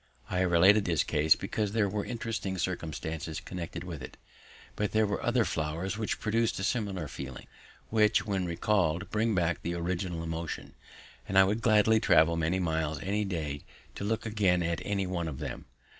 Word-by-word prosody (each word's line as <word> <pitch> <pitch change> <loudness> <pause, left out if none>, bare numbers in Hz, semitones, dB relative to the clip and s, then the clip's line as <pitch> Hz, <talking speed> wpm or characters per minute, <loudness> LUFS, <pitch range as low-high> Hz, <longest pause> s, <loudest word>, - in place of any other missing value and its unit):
I 90 - 0
have 95 -1 +2
related 95 +5 +6
this 85 -3 +2
case 75 +1 +4
because 105 -2 -2
there 110 -3 +2
were 100 +1 -2
interesting 115 -5 -3
circumstances 80 -2 -3
connected 85 -1 -6
with 85 -6 -7
it; 65 - -9 0.6
but 105 -1 -1
there 110 0 +4
were 100 -1 -2
other 120 -1 +2
flowers 80 +6 -2
which 110 0 -2
produced 115 +1 +1
a 95 - -3
similar 100 -7 -1
feeling, 65 -1 -8 0.5
which, 110 -1 +3
when 95 -4 -1
recalled, 90 0 0
bring 110 0 +1
back 85 -2 +1
the 85 +1 -3
original 85 0 -2
emotion; 80 0 -5 0.5
and 95 - 0
I 95 - +9
would 105 +4 0
gladly 110 -1 +5
travel 85 -6 +4
many 85 +2 +1
miles 80 -4 -1
any 105 +2 0
day 75 -6 -3 0.3
to - - -6
look 110 +2 -1
again 100 -5 +2
at 85 0 -1
any 100 -2 -1
one 90 -2 -2
of 75 -4 -5
them. - - -6
95 Hz, 180 wpm, -30 LUFS, 85-105 Hz, 0.6 s, I